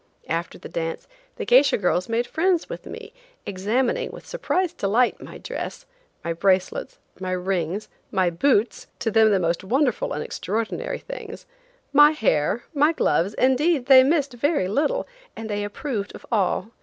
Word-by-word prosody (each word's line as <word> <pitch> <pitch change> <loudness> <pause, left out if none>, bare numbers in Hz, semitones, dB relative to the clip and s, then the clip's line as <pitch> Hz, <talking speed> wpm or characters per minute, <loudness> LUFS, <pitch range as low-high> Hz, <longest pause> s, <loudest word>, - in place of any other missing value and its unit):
After 165 +1 -2
the - - -10
dance 165 -1 -4 0.3
the - - -5
geisha 485 - +5
girls 180 0 0
made 230 +1 0
friends 350 +3 +1
with - - -8
me, - - -9 0.3
examining, 215 +7 -1
with - - -11
surprised 370 -8 -1
delight, 225 +5 +1
my - - -9
dress, - - -6 0.4
my 170 - -2
bracelets, 195 - 0 0.2
my 185 0 -3
rings, 185 +1 -2 0.2
my 185 -2 +1
boots–to 225 +3 0
them 220 0 +5
the 200 -2 +3
most 170 0 -1
wonderful 250 +4 0
and 150 - -3
extraordinary 225 - -3
things,–my - - 0
hair, 215 - +1
my 300 +2 +3
gloves, 200 - +1
indeed 265 +2 +2
they 260 -1 +8
missed 280 -1 +1
very 285 - 0
little, 295 - 0 0.3
and 220 -1 -6
they 205 0 -1
approved 205 0 -4
of - - -12
all. 210 0 0
230 Hz, 150 wpm, -23 LUFS, 190-295 Hz, 0.4 s, they